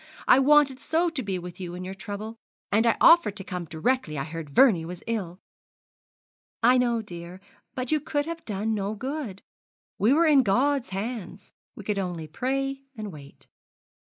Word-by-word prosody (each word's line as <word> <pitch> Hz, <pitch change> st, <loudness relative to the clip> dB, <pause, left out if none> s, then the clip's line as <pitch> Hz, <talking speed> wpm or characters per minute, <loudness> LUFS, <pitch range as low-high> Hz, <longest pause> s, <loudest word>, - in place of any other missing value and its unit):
I 255 Hz, -, +7 dB
wanted 280 Hz, -1 st, +4 dB
so 335 Hz, +3 st, +1 dB
to 300 Hz, -5 st, -3 dB
be 195 Hz, -5 st, -2 dB
with 180 Hz, 0 st, -9 dB
you 175 Hz, -2 st, -6 dB
in 180 Hz, -, -6 dB
your 185 Hz, +1 st, -5 dB
trouble; 210 Hz, +3 st, -7 dB, 0.3 s
and 220 Hz, +3 st, +3 dB
I 230 Hz, -, +3 dB
offered 330 Hz, -12 st, +6 dB
to 195 Hz, -, -4 dB
come 180 Hz, -2 st, -5 dB
directly 165 Hz, -, -1 dB
I 135 Hz, -, -1 dB
heard 160 Hz, -1 st, -7 dB
Vernie 180 Hz, -, +5 dB
was 175 Hz, +1 st, -8 dB
ill!' 195 Hz, -6 st, -3 dB, 1.2 s
'I 250 Hz, +2 st, +6 dB
know, 240 Hz, -2 st, +1 dB
dear; 175 Hz, -2 st, -9 dB, 0.4 s
but 255 Hz, -1 st, -3 dB
you 310 Hz, -, +3 dB
could 290 Hz, 0 st, -2 dB
have 335 Hz, 0 st, -6 dB
done 215 Hz, +1 st, -2 dB
no 205 Hz, 0 st, -2 dB
good. 255 Hz, -5 st, -5 dB, 0.6 s
We 220 Hz, -, +4 dB
were 325 Hz, +4 st, +4 dB
in 295 Hz, -4 st, +6 dB
God's 260 Hz, +5 st, +1 dB
hands. 200 Hz, 0 st, -6 dB, 0.2 s
We 210 Hz, -, -9 dB
could 205 Hz, 0 st, -1 dB
only 175 Hz, -4 st, -3 dB
pray 270 Hz, -, -2 dB, 0.2 s
and 215 Hz, -2 st, -5 dB
wait.' 140 Hz, -3 st, -13 dB
215 Hz, 180 wpm, -26 LUFS, 180-265 Hz, 1.2 s, I